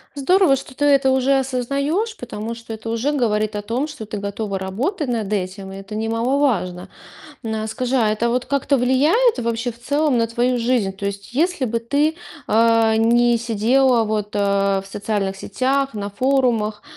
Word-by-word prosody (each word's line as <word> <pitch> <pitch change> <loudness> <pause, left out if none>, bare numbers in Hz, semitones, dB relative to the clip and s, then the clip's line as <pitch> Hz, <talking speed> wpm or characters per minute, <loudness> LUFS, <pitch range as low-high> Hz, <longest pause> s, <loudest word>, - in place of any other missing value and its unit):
Здорово, 330 +2 +4
что 265 -1 -9
ты 290 - 0
это 275 -2 +4
уже 265 +1 +3
осознаёшь, 280 - -1
потому 220 +3 -6
что 230 -1 -9
это 220 +1 -7
уже 230 +6 0
говорит 215 -6 0
о 205 - -2
том, 240 +8 -2
что 295 -8 -8
ты 210 - -5
готова 200 0 -3
работать 250 - -2
над 225 -4 -2
этим. 190 0 -3
И 195 - -8
это 195 +2 -10
немаловажно. 225 -5 0 0.5
На 220 -1 -3
скажи, 255 +3 -2
а 230 -4 +3
это 220 +2 0
вот 250 +1 -1
как-то 280 0 +1
влияет 290 - +3
вообще 235 +1 -2
в 230 - -18
целом 285 0 +1
на 230 - +1
твою 240 +2 0
жизнь? 230 -5 +1
То 200 - -6
есть 200 +3 -7
если 320 0 +1
бы 230 0 -1
ты, 285 +7 0 0.3
э, 225 0 +4
не 235 +1 +3
сидела 235 +2 +2
вот, 210 -1 -3
э, 200 -1 +1
в 195 - -13
социальных 200 -1 -2
сетях, 270 +6 -1
на 205 0 -4
форумах, 235 -3 +1
235 Hz, 175 wpm, -20 LUFS, 210-270 Hz, 0.5 s, Здорово